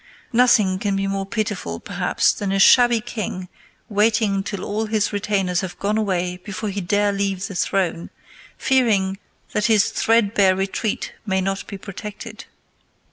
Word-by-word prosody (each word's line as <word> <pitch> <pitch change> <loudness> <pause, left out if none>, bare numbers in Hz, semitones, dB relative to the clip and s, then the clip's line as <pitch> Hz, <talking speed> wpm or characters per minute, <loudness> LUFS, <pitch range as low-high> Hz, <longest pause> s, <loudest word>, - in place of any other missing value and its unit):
Nothing 225 -6 +4
can 200 -1 -1
be 195 0 -1
more 195 0 -2
pitiful, 205 - -3
perhaps, - - +1
than 200 -2 -3
a 195 - +1
shabby 240 +3 +6
king 200 -6 -5 0.4
waiting 210 -1 +2
till 195 -1 -5
all 215 +2 -2
his 215 -1 0
retainers 195 -3 0
have 185 -2 -6
gone 205 +2 -1
away 180 -4 -1
before 200 +3 -5
he 200 0 -3
dare 205 +3 +1
leave 195 -1 -1
the 195 - -6
throne, 175 -2 -1 0.5
fearing 205 -7 +2 0.3
that 210 - 0
his 215 -3 +3
threadbare 205 -4 +3
retreat 195 +3 -2
may 190 -3 0
not 195 +1 -2
be 200 - -7
protected. 210 +3 -8
200 Hz, 150 wpm, -21 LUFS, 190-215 Hz, 0.5 s, shabby